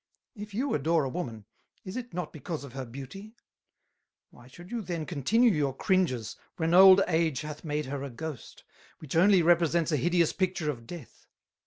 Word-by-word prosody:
If 210 Hz, -3 st, -9 dB
you 265 Hz, +5 st, -1 dB
adore 155 Hz, +2 st, +1 dB
a 135 Hz, -, -2 dB
Woman, 120 Hz, -, -5 dB, 0.4 s
is 185 Hz, -, -7 dB
it 250 Hz, -1 st, -6 dB
not 180 Hz, -2 st, -5 dB
because 155 Hz, +1 st, -6 dB
of 140 Hz, -3 st, -10 dB
her 135 Hz, -1 st, -5 dB
Beauty? 140 Hz, -, -10 dB, 1.0 s
Why 120 Hz, -, -17 dB
should 175 Hz, +7 st, -14 dB
you 240 Hz, -1 st, -2 dB
then 170 Hz, -5 st, -4 dB
continue 220 Hz, -, +2 dB
your 145 Hz, -6 st, 0 dB
Cringes, 150 Hz, -, 0 dB, 0.2 s
when 165 Hz, 0 st, 0 dB
Old 190 Hz, +1 st, +9 dB
Age 160 Hz, -5 st, +1 dB
hath 150 Hz, -1 st, -8 dB
made 150 Hz, -1 st, -2 dB
her 135 Hz, +1 st, -5 dB
a 140 Hz, -, -5 dB
Ghost, 145 Hz, +2 st, -8 dB, 0.3 s
which 155 Hz, -2 st, -8 dB
only 185 Hz, +1 st, +5 dB
represents 170 Hz, 0 st, +3 dB
a 150 Hz, -, +2 dB
hideous 170 Hz, +4 st, +2 dB
Picture 180 Hz, -5 st, -1 dB
of 115 Hz, -4 st, -11 dB
Death? 170 Hz, -8 st, -11 dB
165 Hz, 180 wpm, -28 LUFS, 140-185 Hz, 1.0 s, Old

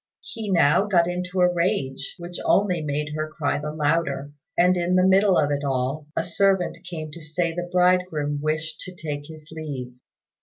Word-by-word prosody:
He 220 Hz, -2 st, -5 dB
now 170 Hz, +2 st, +4 dB
got 175 Hz, -4 st, +3 dB
into 180 Hz, +1 st, -2 dB
a 180 Hz, 0 st, +4 dB
rage, 170 Hz, -7 st, -1 dB
which 175 Hz, 0 st, -7 dB
only 190 Hz, -4 st, +2 dB
made 150 Hz, 0 st, -2 dB
her 155 Hz, 0 st, -3 dB
cry 145 Hz, -2 st, -1 dB
the 150 Hz, +1 st, -4 dB
louder; 145 Hz, -2 st, 0 dB, 0.3 s
and 180 Hz, +1 st, +5 dB
in 175 Hz, +1 st, +1 dB
the 185 Hz, 0 st, +4 dB
middle 190 Hz, 0 st, +5 dB
of 145 Hz, -, +2 dB
it 145 Hz, 0 st, -1 dB
all 135 Hz, +2 st, -1 dB
a 165 Hz, -, +2 dB
servant 190 Hz, 0 st, +1 dB
came 155 Hz, -3 st, -6 dB
to 170 Hz, -, -10 dB
say 165 Hz, +2 st, -2 dB
the 175 Hz, +1 st, -4 dB
bridegroom 180 Hz, -5 st, +2 dB
wished 155 Hz, +1 st, -2 dB
to 185 Hz, -, -8 dB
take 145 Hz, -3 st, -5 dB
his 155 Hz, -1 st, -12 dB
leave. 140 Hz, -6 st, -6 dB
165 Hz, 185 wpm, -24 LUFS, 150-180 Hz, 0.3 s, and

